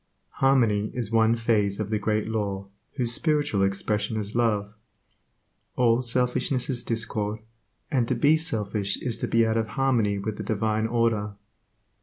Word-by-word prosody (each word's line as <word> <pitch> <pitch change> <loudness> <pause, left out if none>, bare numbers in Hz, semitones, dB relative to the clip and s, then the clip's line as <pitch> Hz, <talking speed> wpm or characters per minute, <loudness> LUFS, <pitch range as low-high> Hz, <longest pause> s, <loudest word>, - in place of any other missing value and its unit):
Harmony 115 -7 +3
is 115 -4 -3
one 115 0 +4
phase 110 -3 +1
of 105 0 -3
the 105 - +1
Great 110 0 0
Law 100 -3 -3 0.3
whose 120 -4 -1
spiritual 145 -8 +1
expression 105 +2 0
is 105 0 -5
love. 105 -4 0 1.0
All 120 -1 +3
selfishness 125 +2 0
is 120 -2 -3
discord, 110 -2 -1 0.5
and 125 -4 +1
to - - 0
be 150 +2 +4
selfish 105 - -1
is 120 -3 -1
to - - -2
be 115 0 +3
out 110 0 +1
of 110 -1 0
harmony 120 -7 +2
with 105 +1 -4
the 105 - -5
Divine 110 +1 0
order. 115 -3 0
110 Hz, 155 wpm, -26 LUFS, 105-120 Hz, 1.0 s, one